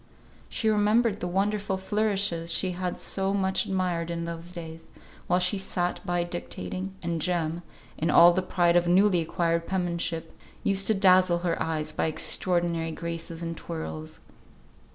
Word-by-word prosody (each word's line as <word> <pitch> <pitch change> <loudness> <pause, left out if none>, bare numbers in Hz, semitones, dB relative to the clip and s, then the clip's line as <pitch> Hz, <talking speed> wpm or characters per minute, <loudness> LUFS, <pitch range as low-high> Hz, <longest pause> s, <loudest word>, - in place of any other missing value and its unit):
She 220 - -2
remembered 215 +1 +2
the 180 - -3
wonderful 195 +2 0
flourishes 195 -4 0
she 185 +2 +3
had 180 0 -3
so 195 0 -1
much 190 -1 +1
admired 180 -3 -1
in 170 0 -3
those 170 +1 -6
days, 165 -2 -9 0.4
while 180 - +3
she 180 +2 +1
sat 180 -2 -2
by 175 -2 0
dictating, 175 - -5
and 170 -1 -2
Jem, 170 -1 -1 0.4
in 160 - 0
all 175 +1 +7
the 185 - +1
pride 175 -2 +2
of 175 0 +3
newly 185 0 +4
acquired 170 +1 -1
penmanship, 170 -3 -2 0.3
used 195 0 +2
to 220 - +3
dazzle 185 -2 +5
her 170 - -1
eyes 155 -1 -2
by 155 - -1
extraordinary 170 0 +1
graces 165 0 -5
and 165 0 -4
twirls. 160 -1 -7
175 Hz, 155 wpm, -27 LUFS, 165-190 Hz, 0.4 s, all